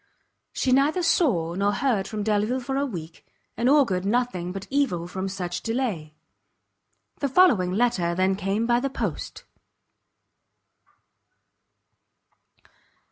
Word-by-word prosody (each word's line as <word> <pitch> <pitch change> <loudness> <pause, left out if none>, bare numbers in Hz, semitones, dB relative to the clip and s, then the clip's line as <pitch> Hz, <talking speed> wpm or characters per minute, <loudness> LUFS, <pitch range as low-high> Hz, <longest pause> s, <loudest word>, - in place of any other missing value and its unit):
She 260 - -1
neither 290 +7 +3
saw 190 - +2
nor 200 +3 +1
heard 215 -5 0
from 215 -1 -4
Delvile 215 +4 0
for 265 +2 -4
a 280 +1 0
week, 165 -8 -8 0.3
and 240 +3 +1
augured 255 -11 +3
nothing 200 -5 -1
but 195 +1 -6
evil 265 -12 0
from 190 +2 -4
such 175 -2 -4
delay. 220 -11 -3 1.0
The 280 - -1
following 245 - +4
letter 190 -5 +1
then 190 +1 +2
came 200 +3 -1
by 240 0 +3
the 275 +2 -2
post. 270 - -5
210 Hz, 120 wpm, -25 LUFS, 185-260 Hz, 1.0 s, following